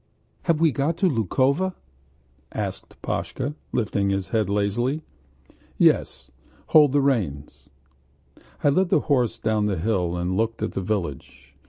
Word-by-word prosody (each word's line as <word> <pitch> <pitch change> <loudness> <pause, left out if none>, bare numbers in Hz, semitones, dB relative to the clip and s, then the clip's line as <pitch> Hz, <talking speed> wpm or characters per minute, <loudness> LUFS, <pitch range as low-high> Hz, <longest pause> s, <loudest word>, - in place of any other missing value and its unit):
"Have 165 -2 +2
we 165 -1 +4
got 145 +5 -1
to 185 - +3
Lukovo?" 140 - +1 0.8
asked - - -5
Pashka, 140 +3 -3 0.2
lifting 100 -4 0
his 95 -1 -1
head 110 -4 0
lazily. 120 +9 0 0.7
"Yes. - - +2 0.4
Hold 150 -3 +6
the 145 - +4
reins!..." 95 - -2 0.9
I 145 - +5
led 180 +6 +2
the 155 - +3
horse 125 -6 +1
down 110 -2 0
the 100 -3 -1
hill 90 -2 0
and 90 +1 -1
looked 115 +2 -1
at - - -1
the - - -3
village. 75 -9 -4
115 Hz, 140 wpm, -24 LUFS, 95-140 Hz, 0.9 s, Hold